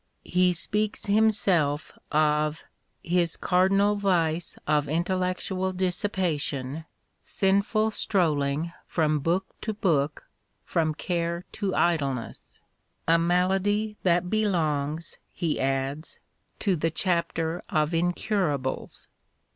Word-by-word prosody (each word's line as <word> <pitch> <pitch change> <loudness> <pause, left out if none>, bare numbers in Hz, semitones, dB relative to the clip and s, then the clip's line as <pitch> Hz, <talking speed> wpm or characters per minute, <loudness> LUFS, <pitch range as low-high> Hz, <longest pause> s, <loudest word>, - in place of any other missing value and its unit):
He 180 0 +3
speaks 210 +5 -1
himself 200 -8 +2 0.2
of 150 0 +1 0.2
" - - -46
his 175 -1 +1
cardinal 195 +3 +3
vice 175 -5 0
of 150 -1 +2
intellec 180 +3 0
tual 190 -1 -3
dissipation, 165 -7 -1 0.4
sinful 200 +3 +1
strolling 160 -5 0
from 155 -2 +1
book 175 +6 0 0.2
to 220 -1 -3
book, 150 -8 0 0.4
from 155 -2 0
care 170 +1 -2
to 200 -3 -2
idleness 140 -8 -1
" - - -47
— - - -45
"a - - +3
malady 190 +5 +1
that 180 0 +2
belongs," 165 -7 -1
he 165 -4 -2
adds, 135 +3 -2 0.2
" - - -44
to 195 -3 +2
the 165 0 0
chapter 170 -1 -1
of 155 +1 +1
incurables." 170 -5 -1
170 Hz, 110 wpm, -26 LUFS, 155-190 Hz, 0.4 s, He